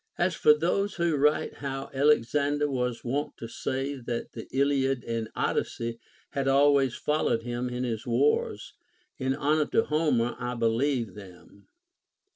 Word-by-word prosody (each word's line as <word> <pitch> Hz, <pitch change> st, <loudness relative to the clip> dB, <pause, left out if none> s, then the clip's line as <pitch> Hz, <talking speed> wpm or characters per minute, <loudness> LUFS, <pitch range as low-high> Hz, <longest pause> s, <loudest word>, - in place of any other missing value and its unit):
As -, -, +1 dB
for 450 Hz, 0 st, +5 dB
those 200 Hz, -, 0 dB
Λvho 170 Hz, -3 st, +1 dB
write 150 Hz, +2 st, +2 dB
how 135 Hz, -1 st, -5 dB
Alexander 145 Hz, +1 st, +2 dB
was 125 Hz, -3 st, -2 dB
wont 140 Hz, +4 st, -2 dB
to 115 Hz, -, -7 dB
say 135 Hz, +4 st, -3 dB
that 120 Hz, -2 st, -4 dB
the 115 Hz, -, -8 dB
Iliad 135 Hz, -2 st, +1 dB
and 115 Hz, -1 st, -3 dB
Odyssey 115 Hz, 0 st, -2 dB, 0.3 s
had 135 Hz, -1 st, -1 dB
always 140 Hz, -2 st, +4 dB
followed 150 Hz, -6 st, 0 dB
him 120 Hz, +1 st, -3 dB
in 125 Hz, +1 st, -3 dB
his 120 Hz, 0 st, -3 dB
wars, 125 Hz, +5 st, +1 dB, 0.5 s
in 130 Hz, 0 st, 0 dB
honor 150 Hz, +2 st, +1 dB
to 225 Hz, -, +2 dB
Homer 145 Hz, -7 st, +1 dB
I 125 Hz, 0 st, -3 dB
believe 115 Hz, -1 st, 0 dB
them. 100 Hz, 0 st, -14 dB
135 Hz, 145 wpm, -28 LUFS, 120-145 Hz, 0.5 s, for